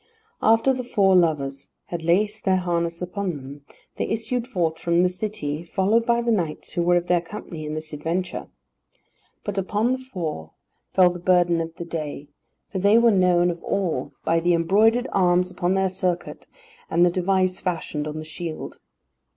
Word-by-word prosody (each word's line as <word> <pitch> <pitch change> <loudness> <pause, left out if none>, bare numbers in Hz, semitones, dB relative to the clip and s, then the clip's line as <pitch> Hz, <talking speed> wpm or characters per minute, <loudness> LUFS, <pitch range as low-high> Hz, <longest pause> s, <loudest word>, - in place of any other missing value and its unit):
After 225 +4 +4
the 255 -1 -3
four 200 -6 +3
lovers 140 -6 +1 0.2
had 175 -1 -4
laced 205 +6 +1
their 190 -1 +3
harness 170 -1 -1
upon 180 -1 -3
them, 140 +1 -10 0.4
they - - -1
issued 230 +2 -2
forth 170 -9 -1
from 170 +1 +2
the 180 - +3
city, 180 -6 -4
followed 205 +6 +1
by 235 0 +2
the 235 - +1
knights 170 -8 -2
who 175 - 0
were 175 +1 +3
of 175 0 +1
their 175 -1 +2
company 170 -3 -8
in 150 - -4
this 155 0 -6
adventure. 170 +5 -3 1.0
But 205 -1 -2
upon 210 +5 0
the 260 - 0
four 165 - -5 0.4
fell 180 -2 +6
the 175 - -7
burden 175 -1 +3
of 165 0 -6
the 170 - -6
day, 150 -3 -5 0.4
for 190 - -2
they 200 +4 +5
were 235 0 +5
known 180 -2 +3
of 170 - -9
all 170 -9 -1
by 165 0 +3
the 175 +1 +2
embroidered 215 +9 +3
arms 180 -1 +3
upon 180 0 0
their 190 0 +2
surcoat, 185 -2 -3 0.4
and 170 +2 +4
the 175 - +3
device 185 +1 +1
fashioned 160 -4 -3
on 155 0 -5
the 155 - -6
shield. 160 0 -6
180 Hz, 180 wpm, -24 LUFS, 165-195 Hz, 1.0 s, fell